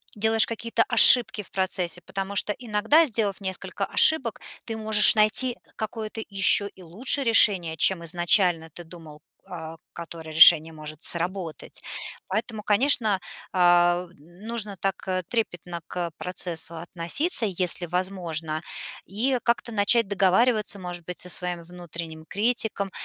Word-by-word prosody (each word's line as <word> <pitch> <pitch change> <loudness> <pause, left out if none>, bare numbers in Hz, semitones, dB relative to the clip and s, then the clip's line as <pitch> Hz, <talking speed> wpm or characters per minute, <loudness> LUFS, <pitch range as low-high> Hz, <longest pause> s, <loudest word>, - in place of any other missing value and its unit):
делаешь 220 +1 +2
какие-то 230 0 -2
ошибки 235 -2 +6
в - - -18
процессе, 180 -2 -2
потому 195 +2 -7
что 205 - +1
иногда, 240 +7 +2
сделав 215 -7 -2
несколько 190 -2 -5
ошибок, 265 -8 +2 0.2
ты 225 - -5
можешь 215 +1 +5
найти 215 +4 +2 0.2
какое-то 220 0 -6
еще 200 0 +3
и 190 - -19
лучше 235 - 0
решение, 195 -8 +2
чем 175 +1 +1
изначально 175 0 +1
ты 175 - -10
думал, 160 -3 -14 0.3
э, 165 -2 -9 0.2
которое 165 -1 -10
решение 160 0 +7
может 155 -1 -8
сработать. 175 -1 +1 0.5
Поэтому, 220 +2 -4
конечно, 215 -2 +3 0.3
а, 175 0 +2
нужно 205 +6 -7
так 195 -1 -2 0.3
трепетно 175 -7 -4
к 175 -1 -5
процессу 175 -2 -4
относиться, 175 - 0
если 180 -2 +1
возможно, 170 -3 -4 0.4
и 245 +7 -1
как-то 235 0 -1
начать 220 +1 +2
договариваться, 205 +3 +1
может 175 -2 -8
быть, 180 -1 -8
со 180 - -2
своим 180 -1 -1
внутренним 170 -2 -10
критиком. 215 -1 -2
190 Hz, 130 wpm, -23 LUFS, 170-220 Hz, 0.5 s, решение